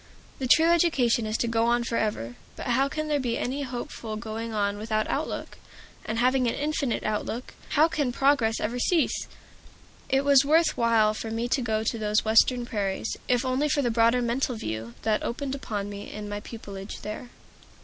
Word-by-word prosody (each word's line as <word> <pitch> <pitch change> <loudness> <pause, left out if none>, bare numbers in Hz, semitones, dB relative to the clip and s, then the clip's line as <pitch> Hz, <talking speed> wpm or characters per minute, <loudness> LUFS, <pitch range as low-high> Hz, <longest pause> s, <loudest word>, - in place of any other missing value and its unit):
The 260 - -1
true 320 +6 +6
education 290 -10 +3
is 215 +1 -1
to 235 - 0
go 230 0 +1
on 240 0 +2
forever. 210 - -2 0.2
But - - -7
how 265 +3 +2
can 310 +2 -3
there 295 -1 +1
be 245 -3 -1
any 270 +3 -2
hopeful 240 -4 -5
going 225 +1 -5
on 205 -1 -1
without 215 0 0
outlook? - - -3 0.5
And 220 - -2
having 255 +1 +3
an 230 - 0
infinite 290 -4 -1
outlook, 215 +3 -3 0.2
how 310 +2 +7
can 290 -6 -1
progress 245 -4 +2
ever 235 +4 -2
cease? 330 +5 +1 0.8
It 270 +1 +2
was 280 -1 +6
worth 320 +4 +3
while 225 -2 +3
for 220 +1 -5
me 225 +2 -2
to 265 - +1
go 220 -2 0
to 230 +1 -1
those 210 0 +1
Western 240 +3 +4
prairies, 205 -2 -2
if 250 +1 +2
only 260 +4 +1
for 285 0 +1
the 240 - +1
broader 230 +2 +3
mental 245 +1 0
view 110 - -5
that 215 -1 +1
opened 270 +3 -3
upon 210 -7 -4
me 205 0 -7
in 210 0 -6
my 205 0 -4
pupilage 200 -2 -8
there. 215 +3 -6
235 Hz, 190 wpm, -26 LUFS, 215-265 Hz, 0.8 s, how